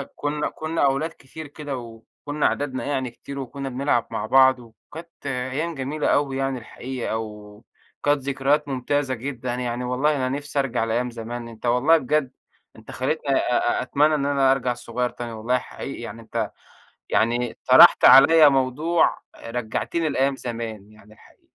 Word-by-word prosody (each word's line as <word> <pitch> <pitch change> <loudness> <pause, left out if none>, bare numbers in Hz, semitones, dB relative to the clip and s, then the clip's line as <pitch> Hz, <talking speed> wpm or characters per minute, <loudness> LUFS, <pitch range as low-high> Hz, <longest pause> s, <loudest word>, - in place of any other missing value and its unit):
كنّا 150 +1 -2
كنّا 155 -1 -1
أولاد 140 +4 +1
كتير 155 0 -11
كده، 145 -2 -6
وكنّا 120 +5 -6
عددنا 135 -3 -3
يعني 135 -3 -2
كتير 140 +3 -9
وكنّا 135 +1 -5
بنلعب 125 -2 0
مع 105 - -3
بعض، 130 +1 +5
وكانت 145 +8 -14
أيّام 135 +5 -3
جميلة 140 +3 -2
أوي 135 -2 +1
يعني 135 -1 -1
الحقيقة، 125 0 -5
وكانت 105 +6 -5
ذكريات 140 +2 0
ممتازة 135 +1 -1
جدًا 125 0 -4
يعني 125 0 -3
والله 135 +5 +1
أنا 130 -2 -1
نفسي 145 +1 -3
أرجع 125 -4 0
لأيام 120 +2 -1
زمان، 115 +1 -6
أنت 115 +1 -11
والله 125 +7 +4
بجد 140 -1 0 0.4
أنت - - -12
خليتني 140 +2 -2
أ 120 0 +1
أ - - -1
أتمنى 150 +4 +2
إن 140 -1 -1
أنا 140 -2 +3
أرجع 125 -2 0
صغيّر 120 +1 -3
تاني 120 -1 -7
والله 115 +3 0
حقيقي 130 0 -7
يعني، 115 0 -8
أنت 110 - -3 0.6
يعني 120 +2 0
طرحت - - +8
عليَّ 150 +3 +8
موضوع 140 +6 +1 0.3
رجعتني 125 +7 -2
لأيام 135 0 +1
زمان 115 -4 -6
يعني 105 0 -18
الحقيقة. - - -22
130 Hz, 155 wpm, -23 LUFS, 120-145 Hz, 0.6 s, طرحت